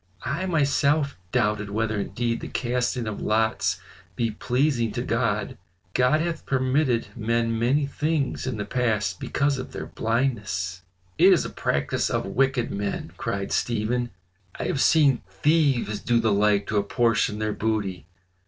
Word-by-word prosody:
"I 155 +9 -1
myself 145 -2 +2 0.2
doubted 105 -4 +1
whether 110 0 -1
indeed 115 +3 -2
the - - -5
casting 125 -1 -1
of 110 -1 -4
lots 105 -5 +1 0.4
be 115 +1 0
pleasing 120 0 0
to - - -2
God. - - -1 0.3
God 125 +5 +3
hath 170 0 -3
permitted 130 -2 +1
men 115 0 0
many 135 +5 +2
things 145 -1 -1
in 125 -4 -2
the 105 - -3
past 105 -5 0
because 140 -1 0
of 130 - -7
their - - -5
blindness." 105 -7 -1 0.4
"It - - +8
is - - +4
a - - -5
practice 70 0 0
of - - -1
wicked 130 +4 +1
men," 100 0 -3
cried 100 -1 -3
Stephen. 120 +1 0 0.5
"I - - -2
have 135 - 0
seen 145 -6 +4
thieves 130 0 +1
do 120 -1 +2
the 110 -2 +2
like 100 0 +3
to 110 - 0
apportion 110 +1 +1
their 110 0 -1
booty. 100 -7 -2
115 Hz, 150 wpm, -25 LUFS, 105-135 Hz, 0.5 s, It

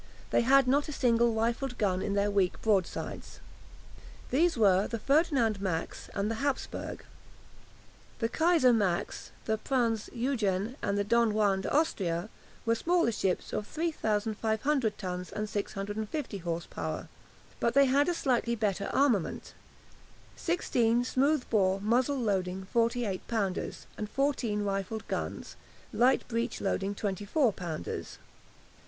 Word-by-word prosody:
They - - +4
had 265 +2 +5
not 285 +4 +2
a - - -4
single 235 -2 +3
rifled 235 +3 -1
gun 190 -3 +1
in 200 - -1
their 200 0 +2
weak 195 -3 +1
broadsides. 200 -5 -1 0.9
These 330 +3 +3
were 195 -3 +4
the 230 - -3
"Ferdinand 265 - +2
Max" 175 -4 -3
and 200 +2 0
the 225 - -4
"Hapsburg." 280 -2 -3 1.2
The 230 - 0
"Kaiser 320 -2 +4
Max," 195 -6 -1 0.2
the 220 -1 0
"Prinz 230 -5 0
Eugen," 230 -4 -1
and 200 0 0
"Don 230 -1 +3
Juan 200 -3 +2
de - - -3
Austria" 195 - 0 0.4
were 230 - +3
smaller 340 +2 +2
ships 190 -4 -1
of 210 - -2
3500 220 -4 0
tons 180 -2 -5
and 215 0 -3
650 205 +5 -3
horse 170 -1 -3
power, - - -5 0.5
but 235 +1 +1
they 280 0 +7
had 280 +4 +3
a 350 - 0
slightly 240 -5 +1
better 200 -3 -1
armament, 245 - +1 0.8
sixteen 245 -9 +1
smooth 275 +3 +1
bore 195 -3 +3
muzzle 245 +7 +1
loading 190 -4 -1
48 230 -4 0
pounders, 200 -5 -2
and 210 -1 -3
fourteen 250 -7 0
rifled 200 +2 -3
guns, - - -4 0.4
light 250 +2 +3
breech 230 0 -2
loading 195 0 -1
24 205 - 0
pounders. 165 - -5
220 Hz, 130 wpm, -30 LUFS, 200-255 Hz, 1.2 s, they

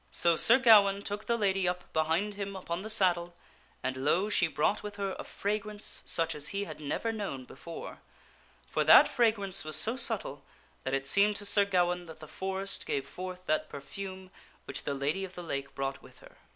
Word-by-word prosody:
So 170 -1 +2
Sir 230 +8 +7
Gawaine 205 -5 +6
took 205 +1 -4
the 235 - +1
lady 195 -3 +1
up 180 0 -4
behind 165 +6 +1
him 200 -1 -5
upon 180 -2 -4
the 215 - -7
saddle, 175 -5 +2 0.5
and 130 0 -2
lo! 175 +10 +1
she 170 - +3
brought 160 +6 0
with 210 -1 -7
her 200 -1 -3
a - - -4
fragrance 210 +1 -3
such 165 -1 +1
as 150 0 -4
he 200 0 -2
had 200 - -8
never 155 +10 -2
known 195 - -5
before; 165 +6 -9 0.7
for - - -1
that - - +8
fragrance 215 -6 +1
was 155 -1 -1
so 220 +9 +2
subtle 260 - -2 0.4
that 130 +1 0
it 135 0 -2
seemed 200 +7 +4
to 205 - -4
Sir 200 0 +4
Gawaine 180 -2 0
that 160 -1 -11
the 155 - -10
forest 190 +3 -2
gave 140 -1 -2
forth 185 +3 -8
that 155 -2 0
perfume 185 +6 -8 0.3
which 140 - -3
the 140 - -1
Lady 145 +8 -1
of 190 -1 -8
the 175 - -7
Lake 140 -4 -5
brought 135 0 -3
with - - -17
her. - - -17
185 Hz, 200 wpm, -30 LUFS, 155-200 Hz, 0.7 s, that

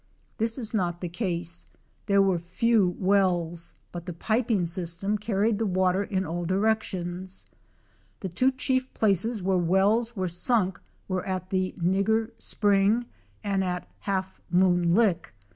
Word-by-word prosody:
This 225 +2 0
is 230 -4 -4
not 175 -5 0
the 175 - -4
case; 170 -3 -3 0.4
there 200 -1 +5
were 190 -3 +2
few 185 +2 +1
wells, 175 -4 +1 0.2
but 175 0 -7
the 180 - -4
piping 220 +1 0
system 175 +4 -1
carried 210 0 0
the 225 - 0
water 185 +1 +2
in 190 -3 -2
all 175 +1 -3
directions 185 -2 -1 0.8
The 190 - -3
two 255 +10 +2
chief 260 0 0
places 215 +1 +1
where 190 -1 +2
wells 200 +7 +2
were 185 -2 -1
sunk 185 +2 +1 0.3
were 185 -1 -2
at 185 -1 -3
the 185 -1 0
"Nigger 195 +6 +1
Spring" 205 +3 +2 0.4
and 195 -2 0
at 180 -1 -2
the - - -27
"Half 190 -2 -3
Moon 175 -1 +3
Lick." 195 - +1
190 Hz, 145 wpm, -27 LUFS, 180-215 Hz, 0.8 s, there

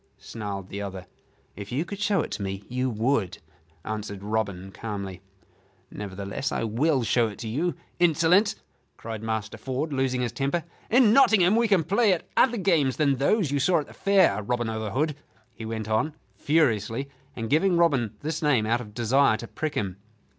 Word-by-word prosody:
snarled 100 -4 -6
the 100 - -5
other. 95 -2 -6 0.5
"If 100 0 -8
you 140 +7 -1
could 200 +3 -7
show 205 -3 +2
it - - -5
to - - -4
me, 95 0 -4
you 125 +1 -1
would," 115 -3 0 0.5
answered 105 -2 -5
Robin, 100 -3 -2
calmly. 100 -4 -6 0.7
"Nevertheless, 100 +5 -4
I - - -1
will 130 +5 +1
show 115 +1 +2
it 105 - -8
to 115 - -6
you, 150 +8 -1 0.2
insolent," 175 +5 +4 0.4
cried 110 -2 -6
Master 110 -1 -3
Ford, 135 +5 -3
losing 130 -2 0
his 120 -2 -1
temper. 140 +7 -1 0.3
"In 235 -2 +5
Nottingham 215 -7 +5
we 235 0 +3
can 195 -6 +3
play 200 +5 +3
at 175 - -4
other 245 -2 +4
games 165 - +2
than 140 -3 +2
those 155 - +2
you 145 - +1
saw 170 +6 +3
at - - -9
the - - -14
Fair, 190 - +3
Robin 120 +2 -1
o' 110 0 -3
th' 105 - -4
Hood," 150 +6 0 0.4
he 115 0 -8
went 110 -1 -4
on, 110 +8 0 0.2
furiously, 130 -4 +1 0.3
and 115 -1 -4
giving 170 - +3
Robin 135 -11 +2
this 155 +1 -3
name 140 -8 +2
out 120 +2 +1
of 105 -3 -11
desire 120 0 +3
to 115 - -8
prick 155 +4 -4
him. 95 -3 -2
125 Hz, 185 wpm, -26 LUFS, 110-160 Hz, 0.7 s, In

